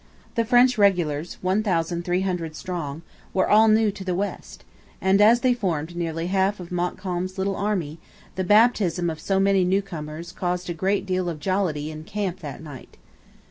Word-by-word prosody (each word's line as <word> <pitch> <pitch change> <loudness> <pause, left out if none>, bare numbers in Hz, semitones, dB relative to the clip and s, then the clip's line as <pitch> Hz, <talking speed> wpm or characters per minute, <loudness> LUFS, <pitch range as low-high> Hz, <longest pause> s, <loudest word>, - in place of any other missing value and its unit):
The 230 - 0
French 245 0 +4
regulars, 175 -6 +1
1,300 180 -3 0
strong, 165 -3 -5 0.3
were 185 - +3
all 215 +2 +6
new 215 -1 +4
to 195 - -9
the 185 -2 -1
West, 200 +3 -5 0.4
and, 190 +2 +3
as 230 +3 +6
they 255 -2 +3
formed 175 -8 -2
nearly 165 -1 -3
half 190 +2 +1
of 180 -1 -9
Montcalm's 180 +1 -3
little 195 +1 -1
army, 180 -7 -2 0.3
the 185 - -2
'baptism' 190 -5 +3
of 160 - -7
so 195 -1 0
many 195 -1 +3
newcomers 170 -4 -3
caused 180 0 -3
a - - -2
great 195 +4 0
deal 185 -2 -1
of 160 -3 -5
jollity 160 -4 -1
in 155 0 -8
camp 195 -1 -3
that 150 -2 -8
night. 145 -5 -11
185 Hz, 165 wpm, -24 LUFS, 170-200 Hz, 0.4 s, all